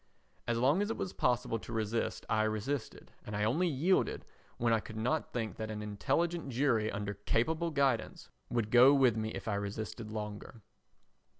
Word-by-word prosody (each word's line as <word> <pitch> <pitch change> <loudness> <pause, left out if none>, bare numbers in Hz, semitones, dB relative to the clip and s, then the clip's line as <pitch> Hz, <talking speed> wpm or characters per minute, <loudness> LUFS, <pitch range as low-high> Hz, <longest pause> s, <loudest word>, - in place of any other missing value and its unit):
As 120 -1 +1
long 135 +10 +3
as 205 - -1
it 225 - -2
was 180 - -3
possible 120 -2 0
to 115 - -10
resist 115 0 -2
I 110 -1 +2
resisted, 110 +5 -3
and 105 - -6
only 115 - +2
yielded 165 +5 +1 0.3
when 115 -1 +2
I 110 - +3
could 110 +1 -9
not 125 +8 -1
think 110 -6 -3
that 110 -1 -4
an 105 -1 -4
intelligent 145 - -1
jury 120 -4 +1
under 100 0 -3
capable 155 - 0
guidance 140 -6 0 0.2
would 115 -3 -1
go 125 +4 +8
with 130 -5 +4
me 110 0 -2
if 110 - -7
I 105 - 0
resisted 105 +2 -4
longer. 105 0 -6
115 Hz, 175 wpm, -32 LUFS, 110-140 Hz, 0.3 s, go